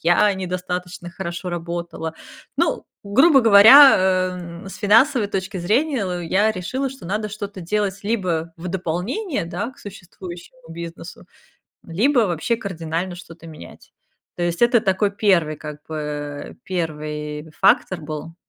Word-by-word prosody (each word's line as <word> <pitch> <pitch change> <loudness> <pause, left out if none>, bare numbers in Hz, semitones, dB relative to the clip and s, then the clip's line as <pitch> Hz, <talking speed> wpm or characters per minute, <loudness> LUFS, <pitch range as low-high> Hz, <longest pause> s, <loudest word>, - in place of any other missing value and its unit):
я 175 +5 +3
недостаточно 180 -1 -5
хорошо 175 0 -5
работала. 170 -1 -5 0.4
Hу, - - 0 0.2
грубо 270 +9 +5
говоря, 225 +6 +9
а, 185 -1 +1 0.2
н - - -9
с - - -9
финансовой 220 +2 +3
точки 190 0 -4
зрения 210 - 0
я 200 +6 +2
решила, 255 +8 -3
что 265 -4 -12
надо 210 +4 -2
что-то 205 -2 -7
делать 200 +2 -2
либо 180 -7 -2
в 175 +2 -7
дополнение, 190 - -3
да, 185 +8 -4
к 275 - -22
существующему 185 +2 -11
бизнесу, 170 +1 -9 0.6
либо 240 - +2
вообще 210 +3 0
кардинально 175 -3 -4
что-то 170 -2 -13
менять. 155 - -13 0.4
То 175 - -3
есть 175 +4 -1
это 240 -1 +5
такой 195 +1 +1
1, 185 -7 +2
как 150 0 -9
бы, 145 -2 -5
1 150 -3 -4
фактор 190 -1 +3
был. 155 +2 -7
185 Hz, 135 wpm, -21 LUFS, 170-210 Hz, 0.6 s, говоря